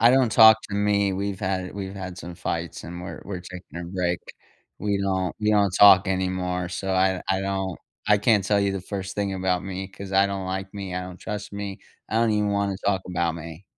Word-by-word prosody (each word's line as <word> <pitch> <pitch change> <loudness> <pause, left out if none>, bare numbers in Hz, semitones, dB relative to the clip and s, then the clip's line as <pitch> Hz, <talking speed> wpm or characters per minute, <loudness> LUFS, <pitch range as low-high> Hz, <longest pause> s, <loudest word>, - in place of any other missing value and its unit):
I 115 - +7
don't 130 -2 +4
talk 110 -1 +9
to - - -3
me, 100 -1 +2
we've 100 0 -3
had 95 -1 -2
we've 95 -1 -5
had 95 -2 -6
some 90 -1 -7
fights 85 -1 -4
and 85 +1 -7
we're 90 - -7
we're 95 -3 -5
taking 90 -2 -9
a - - -5
break. 90 0 -1 0.6
We 100 0 0
don't 95 -3 0
we 105 0 +2
don't 100 -2 +4
talk 100 -1 +8
anymore. 90 -1 -1
So 95 +2 -3
I 95 0 +2
I 95 0 +2
don't 95 -1 -2 0.3
I 105 - +6
can't 105 -1 +3
tell 100 +1 +2
you 100 -1 +1
the 95 - -3
first 95 +1 -5
thing 100 -1 -1
about 95 -1 0
me 95 0 -4
'cause 100 0 -9
I 95 +1 +5
don't 100 -1 -4
like 95 +1 -4
me, 100 -3 -5
I 90 - -2
don't 90 0 -9
trust 105 -1 -5
me, 100 -1 -5 0.3
I - - -3
don't 115 0 +3
even 105 -1 +1
wanna 100 -1 0
talk 95 -2 +1
about 85 -2 0
me. 85 +2 -9
95 Hz, 225 wpm, -25 LUFS, 90-100 Hz, 0.6 s, talk